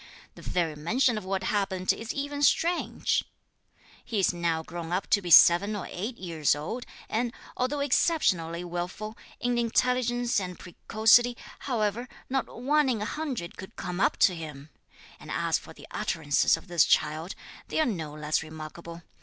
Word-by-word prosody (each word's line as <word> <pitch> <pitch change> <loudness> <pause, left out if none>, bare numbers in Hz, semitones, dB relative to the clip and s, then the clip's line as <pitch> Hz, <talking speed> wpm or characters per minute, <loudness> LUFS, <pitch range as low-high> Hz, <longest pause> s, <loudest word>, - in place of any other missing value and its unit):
The - - -13
very 165 -4 -1
mention 230 - +1
of 215 -3 -5
what 190 0 -2
happened 190 -2 0
is 225 0 -5
even 285 0 -4
strange! 340 +4 +2 0.8
He 225 - -4
is 190 - +3
now 170 -2 -1
grown 170 0 -7
up 185 +2 0
to 205 - +4
be 180 - -5
seven 175 +5 +7
or 205 - -5
eight 220 +7 -4
years 165 -6 +1
old, 180 +12 -5 0.2
and, 235 +2 -1 0.2
although 280 +3 -1
exceptionally 180 - +1
wilful, 180 +5 -5 0.2
in 245 -1 0
intelligence 245 0 +1
and 180 -2 -5
precocity, 225 +6 +3 0.2
however, 235 -1 -1 0.2
not 265 -2 0
one 285 +3 +1
in 235 -4 0
a 210 - -2
hundred 260 - -4
could 190 +4 -10
come 180 0 -5
up - - +2
to 185 - +2
him! 155 -3 -8 0.5
And - - -12
as - - 0
for - - -13
the - - -13
utterances 150 0 +1
of 165 - -14
this 175 -3 +4
child, 155 +4 +1 0.3
they - - -2
are 315 - +4
no 160 -10 -3
less 150 0 0
remarkable. 160 +2 -9
195 Hz, 165 wpm, -28 LUFS, 170-245 Hz, 0.8 s, seven